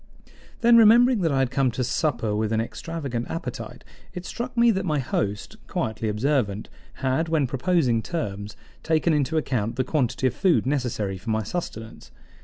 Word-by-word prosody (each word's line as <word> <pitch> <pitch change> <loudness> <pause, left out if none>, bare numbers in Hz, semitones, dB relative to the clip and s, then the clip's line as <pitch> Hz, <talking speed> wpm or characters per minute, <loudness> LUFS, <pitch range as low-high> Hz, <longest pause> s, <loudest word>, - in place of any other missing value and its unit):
Then, 235 0 +6
remembering 235 +1 +6
that 165 -3 +1
I 135 - +1
had 135 -2 +1
come 135 -2 +2
to 125 - -1
supper 120 -4 0
with 110 0 -1
an 110 - +1
extravagant 130 0 -4
appetite, 165 - -6 0.3
it 180 0 -6
struck 245 +4 -5
me 235 0 +6
that 190 -3 -1
my 155 -4 0
host, 105 -6 -2
quietly 110 0 -2
observant, 110 -2 0 0.4
had, 155 +5 +1
when 160 -3 +2
proposing 130 -3 +1
terms, 105 - -5 0.2
taken 160 +1 +1
into 150 +2 +1
account 115 -7 -1
the 130 - +1
quantity 130 -2 -1
of 130 - +2
food 185 0 +2
necessary 120 -8 -1
for 110 +6 -8
my 110 0 0
sustenance. 110 - -6
135 Hz, 170 wpm, -25 LUFS, 110-165 Hz, 0.4 s, Then